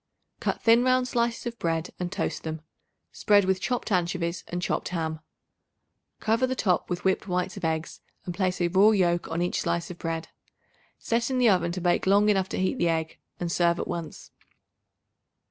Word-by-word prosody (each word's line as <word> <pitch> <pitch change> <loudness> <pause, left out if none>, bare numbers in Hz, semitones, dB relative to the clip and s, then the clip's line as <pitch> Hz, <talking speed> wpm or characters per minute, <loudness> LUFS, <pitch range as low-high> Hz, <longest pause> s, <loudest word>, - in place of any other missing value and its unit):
Cut - - -2
thin 230 +1 +5
round 255 0 +3
slices 235 -1 -1
of 235 -1 -5
bread 165 0 -1
and 180 -1 -3
toast - - -2
them. 160 -1 -5 0.5
Spread 205 -2 +3
with 190 0 +1
chopped 245 -3 -2
anchovies 175 -2 0
and 175 - -3
chopped 175 - -2
ham. 160 -3 -3 1.0
Cover 230 +4 +1
the 260 - -2
top 185 -7 +1
with 175 -1 -3
whipped 190 +1 +1
whites 180 0 -1
of - - -9
eggs 160 0 -2 0.2
and 175 - -4
place 185 0 -1
a 175 - +3
raw 190 +4 +5
yoke 175 -5 +2
on 165 +2 -1
each 175 - -1
slice 170 +1 -2
of 175 - -10
bread. 165 0 -3 0.7
Set 230 +1 -1
in 260 - 0
the 245 -2 +5
oven 175 -3 +2
to 185 - -4
bake 175 +1 +1
long 205 +2 +5
enough 190 -2 +2
to - - -3
heat 190 +7 0
the 175 - +2
egg, 160 -1 -2 0.2
and 175 -1 -2
serve 170 0 +2
at - - -3
once. 170 -2 -6
180 Hz, 195 wpm, -26 LUFS, 170-210 Hz, 1.0 s, thin